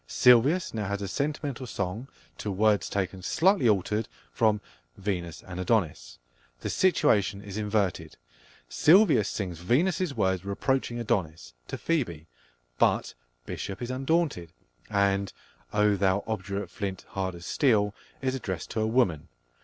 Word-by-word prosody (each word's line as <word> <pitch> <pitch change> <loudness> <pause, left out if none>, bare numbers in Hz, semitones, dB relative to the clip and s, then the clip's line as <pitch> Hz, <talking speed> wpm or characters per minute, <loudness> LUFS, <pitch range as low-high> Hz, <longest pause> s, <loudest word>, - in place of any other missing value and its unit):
Silvius 130 +9 +4
now 105 -3 -2
has 100 0 -2
a - - -3
sentimental 140 +1 -3
song 100 +5 -4 0.3
to 105 - -3
words 105 +1 +2
taken, 95 -1 -2
slightly 170 - +3
altered, 105 +2 +1 0.2
from 110 -2 +2 0.4
Venus 90 -4 -4
and 90 -1 -8
Adonis. 90 - -1 0.4
The - - -3
situation 105 - +2
is 100 -2 -8
inverted: 105 -3 -1 0.5
Silvius 150 - +5
sings 90 -5 -4
Venus's 155 - +1
words 95 -4 +1
reproaching 120 +5 -1
Adonis, 85 - -2
to - - -5
Phoebe; 110 - -1 0.5
but - - +2 0.3
Bishop 100 0 -5
is 120 0 -4
undaunted, 135 - 0 0.4
and 100 -1 +1 0.4
"Oh 105 0 +3
thou 95 0 +1
obdurate 100 -3 -4
flint, 95 -2 -5
hard 95 -2 -3
as 85 +1 -10
steel" 105 -7 +2 0.3
is 130 -1 +1
addressed 95 -9 -4
to 110 - -1
a 110 - +1
woman! 110 - +1
105 Hz, 135 wpm, -28 LUFS, 95-125 Hz, 0.5 s, Silvius